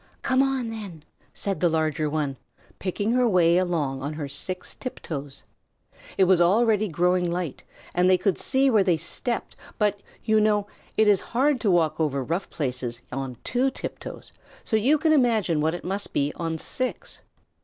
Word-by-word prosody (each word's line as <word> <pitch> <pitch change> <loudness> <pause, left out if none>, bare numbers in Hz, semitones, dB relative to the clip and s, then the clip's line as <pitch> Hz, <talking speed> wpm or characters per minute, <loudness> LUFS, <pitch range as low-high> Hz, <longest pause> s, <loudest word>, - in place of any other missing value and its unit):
"Come 260 0 +3
on, 265 -4 0
then," 200 -9 -8 0.3
said 195 -1 -3
the 175 - +3
larger 155 -1 0
one, 145 -3 -1 0.4
picking 205 +3 -1
her 250 0 +3
way 175 -3 +4
along 160 -7 0
on 145 +3 -3
her 150 -2 -4
six 180 +7 -5
tiptoes. 145 - -7 0.7
It 195 - +5
was 185 -1 +4
already 215 +3 +3
growing 180 +1 +1
light, 175 -5 -3 0.3
and 180 +1 +3
they 185 - +6
could 195 0 0
see 270 0 +2
where 215 -4 +5
they 175 -3 +2
stepped, 235 - -3 0.2
but, 205 -1 +1 0.2
you 220 0 +4
know, 210 -1 +2 0.3
it 220 - +4
is 200 -3 +5
hard 265 +1 +1
to 210 - +2
walk 160 -3 +2
over 140 -4 0
rough 170 +8 -2
places 125 -5 -4
on 130 -1 -4
two 250 +2 +1
tiptoes, - - -8 0.3
so 220 - -1
you 255 +8 +4
can 310 +1 +3
imagine 220 - +2
what 160 +2 +1
it - - -8
must 195 +3 -3
be 145 +1 0
on 165 -1 -3
six. 255 +10 -4
180 Hz, 175 wpm, -25 LUFS, 155-220 Hz, 0.7 s, they